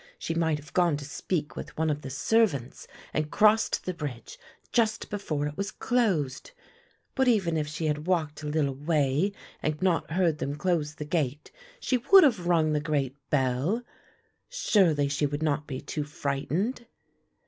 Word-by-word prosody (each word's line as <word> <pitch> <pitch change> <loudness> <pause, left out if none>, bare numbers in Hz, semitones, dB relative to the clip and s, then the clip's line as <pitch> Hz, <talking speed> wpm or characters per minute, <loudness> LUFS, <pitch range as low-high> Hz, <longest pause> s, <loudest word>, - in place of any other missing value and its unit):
She 165 - -3
might 165 -2 +1
have 150 -1 -13
gone 175 -5 +3
to 145 - -7
speak 150 +2 -3
with - - -8
one 160 0 +1
of 145 0 -3
the 135 - -7
servants 140 - 0 0.3
and 155 0 -1
crossed 215 +3 +3
the 185 - -2
bridge 145 -8 -7 0.3
just 225 -2 +1
before 155 -8 -2
it 150 0 -4
was 200 0 -2
closed. 195 - 0 0.6
But 265 -1 +2
even 195 -9 +2
if 150 -2 -1
she 160 +2 -4
had 150 +1 -1
walked 155 -5 0
a 150 - -5
little 150 -2 0
way 145 +4 +1 0.3
and 155 -1 -1
not 185 -3 +1
heard 170 -4 +2
them 140 +1 -2
close 155 -2 -1
the 150 - -6
gate, 150 -2 -2 0.3
she 255 - +1
would 385 +11 +7
have 220 - +2
rung 160 -3 +3
the 150 - +2
great 145 -3 -1
bell. 140 - +1 0.7
Surely 185 - +3
she 145 +1 0
would 145 +2 -3
not 150 -1 0
be 130 -3 -4
too 150 - -4
frightened." 150 - -2
155 Hz, 170 wpm, -28 LUFS, 145-185 Hz, 0.7 s, would